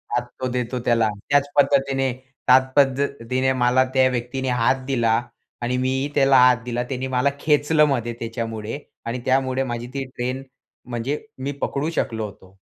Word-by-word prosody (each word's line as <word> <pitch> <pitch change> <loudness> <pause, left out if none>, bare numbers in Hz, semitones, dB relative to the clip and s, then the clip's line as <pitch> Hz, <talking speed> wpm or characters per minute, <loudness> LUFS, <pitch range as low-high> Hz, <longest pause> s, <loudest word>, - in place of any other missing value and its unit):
हात 120 0 -1
तो 130 - 0
देतो 125 0 -2
त्याला, 115 -2 +3 0.2
त्याच 145 0 +3
पद्धतीने 135 -1 +3 0.4
त्याच 130 +1 +7
पद्धतीने 130 -2 +1
मला 125 +1 +4
त्या 130 -1 +5
व्यक्तीने 125 +2 -3
हात 130 +2 +2
दिला. 120 -4 +2 0.4
आणि 125 +1 -1
मी 130 +2 0
त्याला 135 -1 +5
हात 125 -1 +6
दिला. 120 0 -2
त्याने 130 +1 -4
मला 130 +2 +2
खेचलं 150 +1 +3
मध्ये 120 -4 -1
त्याच्यामुळे 115 +1 -4 0.3
आणि 120 +2 -3
त्यामुळे 130 0 +1
माझी 120 -2 -4
ती 140 - -2
ट्रेन 130 +2 -3 0.5
म्हणजे 125 - -3 0.2
मी 140 - -1
पकडू 145 +3 -1
शकलो 115 -9 -2
होतो. 95 -1 -13
130 Hz, 155 wpm, -22 LUFS, 120-135 Hz, 0.5 s, त्याच